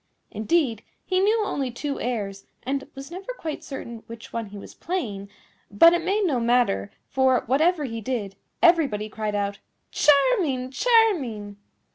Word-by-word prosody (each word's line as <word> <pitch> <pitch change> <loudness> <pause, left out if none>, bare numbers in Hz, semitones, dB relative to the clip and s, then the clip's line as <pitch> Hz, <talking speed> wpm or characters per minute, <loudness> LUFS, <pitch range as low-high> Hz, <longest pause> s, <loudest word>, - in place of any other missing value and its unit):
Indeed, 230 -1 0 0.2
he 370 -1 +1
knew 425 +2 +2
only 275 -9 -2
two 275 +4 -4
airs, 205 -5 -3 0.2
and 270 +2 -2
was 275 +3 -9
never 385 +8 -6
quite 315 -2 -5
certain 235 -4 -7
which 230 -1 -11
one 230 -2 -3
he 205 +1 -10
was 200 - -10
playing; 210 - -4 0.4
but 330 +12 +7
it 345 -1 0
made 395 +3 +1
no 280 -8 +1
matter, 235 - +2 0.2
for, 260 -2 +2
whatever 310 +6 +2
he 230 -4 -4
did, 210 -4 -3 0.3
everybody 285 -12 +3
cried 215 -1 -3
out, 200 0 -2 0.3
"Charming! 285 - +3
charming!" 275 - +2
260 Hz, 150 wpm, -24 LUFS, 215-335 Hz, 0.4 s, but